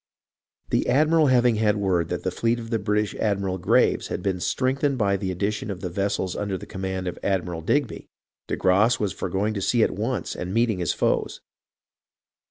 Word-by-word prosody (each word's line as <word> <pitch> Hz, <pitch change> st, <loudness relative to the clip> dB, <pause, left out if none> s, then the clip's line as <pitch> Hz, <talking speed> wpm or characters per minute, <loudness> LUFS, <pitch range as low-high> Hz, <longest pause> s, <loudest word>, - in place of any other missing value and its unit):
The -, -, +1 dB
admiral 155 Hz, +2 st, +4 dB
having 125 Hz, -3 st, +4 dB
had 105 Hz, -1 st, +2 dB
word 90 Hz, -5 st, 0 dB
that 90 Hz, -, -3 dB
the 95 Hz, -, -1 dB
fleet 115 Hz, +5 st, 0 dB
of 115 Hz, 0 st, -8 dB
the 115 Hz, -, +1 dB
British 105 Hz, 0 st, 0 dB
admiral 100 Hz, -3 st, -1 dB
Graves -, -, +2 dB
had 90 Hz, -, -4 dB
been 95 Hz, -2 st, -1 dB
strengthened 135 Hz, +6 st, 0 dB
by 100 Hz, -4 st, +2 dB
the 95 Hz, -1 st, -3 dB
addition 100 Hz, +4 st, -2 dB
of 95 Hz, -2 st, -5 dB
the 90 Hz, -, -4 dB
vessels 95 Hz, -1 st, -1 dB
under 100 Hz, -2 st, -2 dB
the -, -, -9 dB
command 95 Hz, -1 st, -4 dB
of 90 Hz, -, -5 dB
Admiral 90 Hz, -4 st, -1 dB
Digby, 135 Hz, -, -1 dB, 0.4 s
de -, -, -1 dB
Grasse 105 Hz, +6 st, +3 dB
was 105 Hz, -3 st, -1 dB
for -, -, -4 dB
going 100 Hz, +4 st, 0 dB
to 100 Hz, -, -3 dB
sea 115 Hz, +4 st, +2 dB
at -, -, +2 dB
once 115 Hz, +6 st, -3 dB
and 90 Hz, +3 st, -4 dB
meet 115 Hz, 0 st, +3 dB
ing 95 Hz, -, -4 dB
his 85 Hz, -, 0 dB
foes. -, -, -1 dB
100 Hz, 200 wpm, -24 LUFS, 95-115 Hz, 0.4 s, admiral